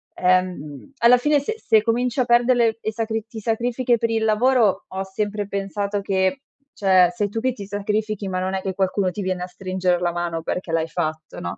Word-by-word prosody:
ehm, 180 - 0
alla 235 +1 +6
fine 290 +3 +2
se 445 +11 -3
se 220 - +3
cominci 240 +3 0
a - - +4
perderle 240 -1 +3
e 220 -1 -3
sacri 225 0 -2
ti 225 0 -8
sacrifichi 235 +2 0
per 230 +1 -1
il 225 -1 0
lavoro 220 -2 +3
ho 190 +1 -4
sempre 205 +2 -3
pensato 200 +1 -2
che 190 +4 0 0.4
cioè 185 -3 +4
sei 210 -3 -1
tu 225 - -3
che 255 +2 0
ti 205 -4 -8
sacrifichi 205 +1 -2
ma 185 -1 -2
non 185 +1 -2
è 190 - 0
che 190 -1 -3
qualcuno 190 0 0
ti 205 - -5
viene 185 -1 -2
a 180 - -5
stringere 185 -1 -1
la 175 -1 0
mano 170 -1 -3
perché 175 +1 -4
l'hai 165 0 +1
fatto 155 -2 -4
no? 85 - -5
205 Hz, 205 wpm, -22 LUFS, 185-230 Hz, 0.4 s, alla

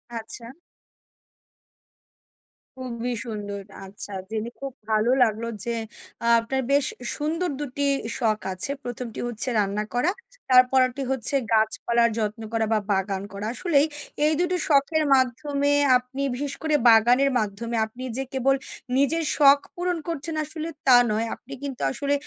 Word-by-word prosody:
আচ্ছা। 230 +1 -4 2.3
খুবই 245 -1 -4
সুন্দর। 205 -3 -5 0.2
আচ্ছা। 200 +1 -4 0.2
জেনে 220 +1 -3
খুব 275 -1 -5 0.2
ভালো 215 +3 +2
লাগলো 225 0 -1 0.2
যে 235 - -1 0.5
আ - - +1
আপনার 265 +4 -2
বেশ 285 0 +3 0.3
সুন্দর 330 +4 -2
দুটি 285 0 -2 0.3
শখ 220 -3 +1
আছে। 185 +9 +4
প্রথমটি 245 -1 -6
হচ্ছে 240 +1 +1
রান্না 205 +1 0
করা, 250 +9 +2 0.4
তারপরেরটি 255 +1 +4
হচ্ছে 265 +1 +3 0.2
গাছপালার 235 +2 +2
যত্ন 215 +1 -2
করা 225 -1 +1
বা 215 - +3
বাগান 195 0 -1
করা। 200 +1 -5
আসলেই 295 0 +2 0.4
এই 310 - +3
দুটো 360 +1 0
শখের 310 +2 +3
মাধ্যমে 280 +3 0 0.3
আপনি 250 +2 -7
বিশেষ 285 +1 -4
করে 310 -1 +2
বাগানের 245 +5 +5
মাধ্যমে 220 +2 -3
আপনি 240 +4 -10
যে 270 - -1
কেবল 270 +1 +2 0.4
নিজের 315 +4 +2
শখ 285 -1 +7 0.2
পূরণ 355 0 -1
করছেন 325 -1 -2
আসলে 315 +1 -6 0.2
তা 250 - +8
নয়, 220 +2 0
আপনি 270 - -12
কিন্তু 275 -3 -5
আসলে 285 - -1
250 Hz, 135 wpm, -24 LUFS, 225-280 Hz, 2.3 s, তা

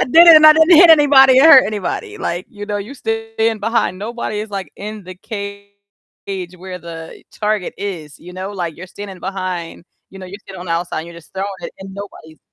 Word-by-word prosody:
I - - +3
did 335 +7 +6
it 320 - +10
and 310 0 +7
I 310 - +10
didn't 320 +1 +5
hit 340 0 +8
anybody 270 -4 +6
or - - +5
hurt 280 -5 +8
anybody, 215 - -5
like, 175 - -4
you 205 -1 -9
know, 205 -1 -3
you're 220 +8 -8
stand 225 -2 -2
behind, 225 -4 -1
nobody 215 -1 -5
is 215 - -7
like 195 -6 -6
in 210 -1 -8
the 185 0 -10
cage 200 -1 -8 0.9
where 185 0 -9
the 165 -1 -10
target 210 -3 -2
is, 175 -7 -7
you 180 - -13
know? 190 +2 -6
Like 175 -5 -5
you're 185 +2 -10
standing 195 -2 -10
behind, 185 -3 -5 0.3
you 195 - -12
know, 185 - -9
you're 200 +3 -10
standing 190 -2 -11
on 180 - -9
the 165 - -2
outside 170 0 -3
and 165 - -10
you're 170 - -12
just 170 - -16
throwing 190 +1 -3
it - - -8
and 190 0 -10
nobody's 180 -6 -11
200 Hz, 225 wpm, -17 LUFS, 185-225 Hz, 0.9 s, it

